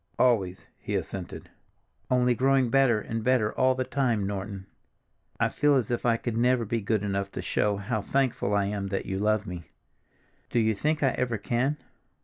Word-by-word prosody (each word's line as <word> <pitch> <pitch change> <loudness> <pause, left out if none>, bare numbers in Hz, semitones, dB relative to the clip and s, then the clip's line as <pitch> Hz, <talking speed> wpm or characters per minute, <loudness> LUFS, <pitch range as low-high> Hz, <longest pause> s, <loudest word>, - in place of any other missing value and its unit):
"Always," 100 -8 +2
he - - -4
assented. - - -5 0.6
"Only 125 -1 +3
growing 130 0 +2
better 135 -5 +4
and 115 +1 -4
better 125 -4 +2
all 130 0 +3
the 130 - -1
time, 125 -7 0
Norton. 100 -1 -5 0.7
I - - +2
feel 145 -1 +2
as 125 -4 0
if 120 0 -1
I 115 -1 +3
could 115 -1 -4
never 120 0 +2
be 115 +2 -1
good 105 0 0
enough 100 -1 -2
to - - -4
show 105 -1 0
how 100 +2 -2
thankful 125 -4 0
I 100 -1 +2
am 100 -1 -3
that 95 0 -3
you 95 0 -3
love 105 0 +1
me. 90 -4 -8 0.8
Do 120 - +1
you 110 -1 +2
think 150 +8 -1
I 135 - +5
ever 125 -3 -1
can?" 125 +8 0
115 Hz, 185 wpm, -27 LUFS, 100-125 Hz, 0.8 s, I